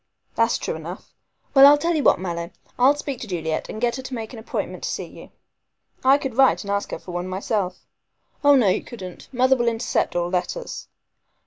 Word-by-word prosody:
"That's -, -, +2 dB
true -, -, -3 dB
enough. -, -, -8 dB, 0.4 s
Well, 275 Hz, 0 st, +9 dB
I'll 290 Hz, +1 st, +7 dB
tell 335 Hz, +3 st, 0 dB
you 310 Hz, -, +1 dB
what, -, -, +4 dB
Mallow, 170 Hz, -2 st, -4 dB, 0.3 s
I'll 265 Hz, +4 st, +6 dB
speak 280 Hz, -3 st, -5 dB
to 230 Hz, -, -6 dB
Juliet 160 Hz, -4 st, -3 dB
and 215 Hz, -, -6 dB
get 240 Hz, +1 st, 0 dB
her -, -, -5 dB
to 260 Hz, -, -8 dB
make 225 Hz, +1 st, -6 dB
an 235 Hz, -, -8 dB
appointment 220 Hz, -, -4 dB
to -, -, -3 dB
see -, -, -3 dB
you." -, -, -13 dB, 0.7 s
"I 265 Hz, +2 st, +6 dB
could 270 Hz, -3 st, -4 dB
write 265 Hz, -2 st, +4 dB
and 200 Hz, -, -4 dB
ask 200 Hz, 0 st, -1 dB
her -, -, -4 dB
for 180 Hz, -, -10 dB
one 175 Hz, +1 st, -3 dB
myself." 185 Hz, 0 st, -2 dB, 0.6 s
"Oh, 285 Hz, 0 st, +7 dB
no, 245 Hz, -6 st, +4 dB
you -, -, 0 dB
couldn't. 185 Hz, -7 st, -10 dB
Mother 260 Hz, +1 st, +3 dB
will 240 Hz, -2 st, 0 dB
intercept 230 Hz, -4 st, 0 dB
all 175 Hz, 0 st, 0 dB
letters." 330 Hz, -, -3 dB
235 Hz, 215 wpm, -23 LUFS, 185-270 Hz, 0.7 s, Well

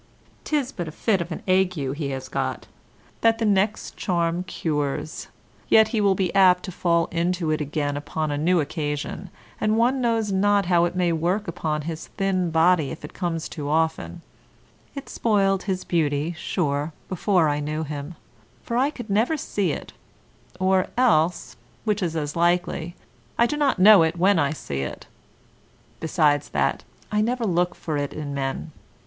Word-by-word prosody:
'Tis 285 Hz, -4 st, 0 dB
but 175 Hz, -3 st, -5 dB
a -, -, -5 dB
fit 195 Hz, +3 st, 0 dB
of 170 Hz, +1 st, -6 dB
an 160 Hz, -, -5 dB
ague 185 Hz, 0 st, +3 dB
he 140 Hz, 0 st, -3 dB
has 130 Hz, -1 st, -5 dB
got, -, -, -3 dB, 0.6 s
that 225 Hz, 0 st, +4 dB
the 225 Hz, -, -1 dB
next 205 Hz, +1 st, +1 dB
charm 170 Hz, -1 st, 0 dB
cures, 150 Hz, -4 st, -3 dB, 0.4 s
yet 220 Hz, 0 st, +6 dB
he 220 Hz, -1 st, 0 dB
will 200 Hz, -2 st, +3 dB
be 185 Hz, -2 st, -1 dB
apt 185 Hz, -2 st, +5 dB
to 185 Hz, -, -5 dB
fall 170 Hz, -1 st, +1 dB
into 170 Hz, -1 st, 0 dB
it 155 Hz, -, 0 dB
again 145 Hz, 0 st, -2 dB
upon 150 Hz, +1 st, -3 dB
a -, -, -1 dB
new 175 Hz, +3 st, +3 dB
occasion, 150 Hz, +4 st, -3 dB, 0.3 s
and 215 Hz, +1 st, +1 dB
one 250 Hz, +3 st, +2 dB
knows 225 Hz, -3 st, +1 dB
not 200 Hz, +1 st, +3 dB
how 175 Hz, -1 st, +3 dB
it 175 Hz, -, -3 dB
may 180 Hz, -2 st, +2 dB
work 175 Hz, +6 st, 0 dB
upon 155 Hz, -2 st, -2 dB
his 160 Hz, 0 st, -5 dB
thin 190 Hz, -3 st, +1 dB
body 160 Hz, -2 st, +3 dB
if 160 Hz, -, -7 dB
it -, -, -11 dB
comes 165 Hz, -3 st, -3 dB
too 145 Hz, -3 st, -6 dB
often; 160 Hz, +2 st, -1 dB, 0.7 s
it 275 Hz, -, -7 dB
spoiled 195 Hz, -4 st, +1 dB
his 185 Hz, 0 st, -3 dB
beauty, 155 Hz, -1 st, 0 dB
sure, 150 Hz, -2 st, -2 dB
before 185 Hz, -2 st, +2 dB
I 145 Hz, 0 st, 0 dB
knew 155 Hz, +2 st, -3 dB
him, 150 Hz, +2 st, -6 dB, 0.5 s
for 235 Hz, -, -2 dB
I 265 Hz, +3 st, +3 dB
could 245 Hz, -6 st, -8 dB
never 225 Hz, +10 st, +1 dB
see 200 Hz, -, -1 dB
it, -, -, -6 dB, 0.7 s
or 185 Hz, 0 st, +2 dB
else 180 Hz, -9 st, +2 dB, 0.3 s
(which 210 Hz, -2 st, 0 dB
is 170 Hz, -3 st, -1 dB
as 150 Hz, -2 st, -3 dB
likely) 175 Hz, 0 st, 0 dB, 0.4 s
I 235 Hz, -, +5 dB
do 270 Hz, -, -1 dB
not 290 Hz, -2 st, +1 dB
know 200 Hz, 0 st, +8 dB
it 160 Hz, +1 st, +1 dB
when 190 Hz, +1 st, +4 dB
I 145 Hz, -3 st, +2 dB
see 70 Hz, -, -4 dB
it; 70 Hz, -, -6 dB, 0.9 s
besides 150 Hz, -3 st, +1 dB
that, 70 Hz, -1 st, 0 dB, 0.3 s
I 210 Hz, 0 st, +2 dB
never 240 Hz, +2 st, 0 dB
look 180 Hz, -2 st, +1 dB
for 155 Hz, -3 st, -3 dB
it 145 Hz, -1 st, -3 dB
in 145 Hz, -2 st, -5 dB
men. 135 Hz, +3 st, -3 dB
175 Hz, 175 wpm, -24 LUFS, 155-195 Hz, 0.9 s, know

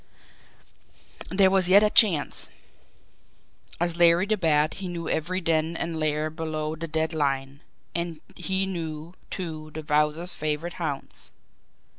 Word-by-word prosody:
There 190 Hz, +1 st, +4 dB
was 190 Hz, -2 st, +2 dB
yet 200 Hz, +3 st, +7 dB
a 210 Hz, -, +3 dB
chance. 190 Hz, -, +4 dB, 1.3 s
As 170 Hz, 0 st, 0 dB
Larry 170 Hz, +1 st, +5 dB
the 215 Hz, +1 st, +1 dB
Bat 155 Hz, -5 st, +2 dB
he 190 Hz, -, -4 dB
knew 170 Hz, -2 st, -5 dB
every 180 Hz, +4 st, -1 dB
den 165 Hz, 0 st, 0 dB
and 165 Hz, -1 st, -3 dB
lair 155 Hz, 0 st, 0 dB
below 155 Hz, -1 st, -3 dB
the 165 Hz, +1 st, -5 dB
dead 160 Hz, +1 st, -1 dB
line, 140 Hz, -2 st, -1 dB, 0.3 s
and 170 Hz, -2 st, -3 dB, 0.2 s
he 190 Hz, +1 st, -1 dB
knew, 165 Hz, -3 st, -5 dB, 0.2 s
too, 160 Hz, -4 st, -5 dB
the 155 Hz, -, -5 dB
Wowzer's 150 Hz, +3 st, +1 dB
favourite 155 Hz, +3 st, -3 dB
haunts. 145 Hz, -4 st, -4 dB
165 Hz, 135 wpm, -26 LUFS, 155-175 Hz, 1.3 s, yet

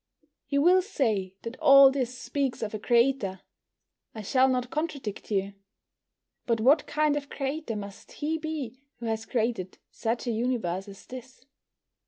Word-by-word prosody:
You 280 Hz, 0 st, +1 dB
will 365 Hz, +2 st, +6 dB
say 220 Hz, -, -1 dB
that 230 Hz, +2 st, -7 dB
all 275 Hz, -3 st, +8 dB
this 255 Hz, -2 st, -2 dB
speaks 270 Hz, -2 st, -2 dB
of 215 Hz, -, -4 dB
a 215 Hz, -, -3 dB
Creator. 235 Hz, -4 st, +2 dB, 0.7 s
I 220 Hz, -, -6 dB
shall 260 Hz, +6 st, +3 dB
not 250 Hz, -1 st, -1 dB
contradict 295 Hz, -9 st, -4 dB
you. 200 Hz, -1 st, -1 dB, 0.9 s
But 230 Hz, -2 st, +1 dB
what 275 Hz, +7 st, +4 dB
kind 305 Hz, -1 st, +1 dB
of 290 Hz, -1 st, -4 dB
Creator 275 Hz, -3 st, -3 dB
must 200 Hz, -1 st, -8 dB
He 315 Hz, +2 st, -2 dB
be 295 Hz, -6 st, -5 dB, 0.2 s
who 235 Hz, -, -8 dB
has 225 Hz, 0 st, -2 dB
created 220 Hz, -6 st, -2 dB
such 230 Hz, +2 st, -2 dB
a 240 Hz, -, 0 dB
universe 220 Hz, -6 st, -1 dB
as 195 Hz, -1 st, -12 dB
this? 255 Hz, 0 st, -11 dB
250 Hz, 155 wpm, -27 LUFS, 220-280 Hz, 0.9 s, all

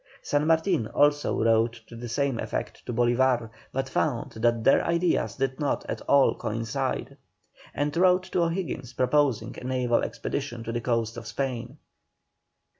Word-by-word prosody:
San 145 Hz, +1 st, +1 dB
Martin 160 Hz, -, +2 dB
also 145 Hz, -3 st, +2 dB
wrote 115 Hz, +1 st, +2 dB
to 115 Hz, -, -12 dB
the 120 Hz, +1 st, -7 dB
same 135 Hz, -1 st, 0 dB
effect -, -, -4 dB
to -, -, -2 dB
Bolívar, 120 Hz, 0 st, +2 dB, 0.2 s
but 135 Hz, 0 st, -2 dB
found 130 Hz, -3 st, -1 dB
that 115 Hz, 0 st, +1 dB
their 135 Hz, -, +5 dB
ideas 170 Hz, +1 st, +1 dB
did 135 Hz, 0 st, -2 dB
not 145 Hz, -2 st, -1 dB
at -, -, -4 dB
all 140 Hz, -1 st, +5 dB
coincide. 115 Hz, +4 st, -3 dB, 0.6 s
And 145 Hz, +2 st, -1 dB
wrote 180 Hz, +1 st, +4 dB
to 180 Hz, -, +1 dB
O'Higgins 165 Hz, -7 st, -2 dB
proposing 130 Hz, -1 st, +1 dB
a -, -, -12 dB
naval 125 Hz, -2 st, +1 dB
expedition 125 Hz, -5 st, -4 dB
to 115 Hz, -, -4 dB
the 120 Hz, 0 st, -2 dB
coasts 115 Hz, -1 st, -1 dB
of 115 Hz, -1 st, -7 dB
Spain. 125 Hz, 0 st, -4 dB
130 Hz, 155 wpm, -27 LUFS, 115-145 Hz, 0.6 s, their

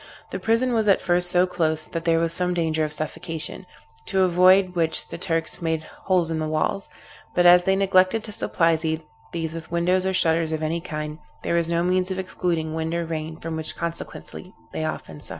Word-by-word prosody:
The -, -, -3 dB
prison 235 Hz, +3 st, +1 dB
was 220 Hz, -2 st, +1 dB
at 195 Hz, -, +5 dB
first 175 Hz, 0 st, +2 dB
so 180 Hz, +1 st, +4 dB
close, 160 Hz, -3 st, -1 dB
that 165 Hz, 0 st, -5 dB
there 165 Hz, -1 st, +3 dB
was 165 Hz, 0 st, 0 dB
some 180 Hz, -1 st, 0 dB
danger 160 Hz, -2 st, 0 dB
of 155 Hz, -, -2 dB
suffocation, 160 Hz, +2 st, -4 dB, 0.4 s
to 190 Hz, -1 st, +1 dB
avoid 185 Hz, +1 st, +5 dB
which 165 Hz, -2 st, 0 dB
the -, -, -6 dB
Turks 165 Hz, -2 st, -1 dB
had -, -, -16 dB
made 160 Hz, -1 st, -1 dB, 0.2 s
holes 180 Hz, -3 st, +2 dB
in 160 Hz, -, -1 dB
the 155 Hz, -, -1 dB
walls; 155 Hz, +5 st, -1 dB, 0.5 s
but 175 Hz, -, +3 dB
as 175 Hz, 0 st, +7 dB
they 190 Hz, 0 st, +3 dB
neglected 195 Hz, +2 st, +3 dB
to 215 Hz, -, -7 dB
supply 165 Hz, -4 st, +1 dB
these 160 Hz, 0 st, -5 dB
with 165 Hz, -1 st, -8 dB
windows 180 Hz, +2 st, +1 dB
or 190 Hz, -, 0 dB
shutters 165 Hz, -2 st, +2 dB
of 155 Hz, 0 st, -2 dB
any 165 Hz, +2 st, -1 dB
kind, 155 Hz, -3 st, -5 dB, 0.2 s
there -, -, -1 dB
was 170 Hz, -1 st, +1 dB
no 170 Hz, 0 st, +1 dB
means 185 Hz, +1 st, +1 dB
of 190 Hz, -, -3 dB
excluding 175 Hz, -4 st, -2 dB
wind 160 Hz, +1 st, -2 dB
or 170 Hz, 0 st, -1 dB
rain, 160 Hz, -1 st, -4 dB
from 165 Hz, 0 st, -4 dB
which 160 Hz, -1 st, -3 dB
consequently 170 Hz, +2 st, -7 dB, 0.2 s
they 155 Hz, -, -2 dB
often 80 Hz, -, -5 dB
suffered. -, -, -13 dB
170 Hz, 210 wpm, -24 LUFS, 160-185 Hz, 0.5 s, as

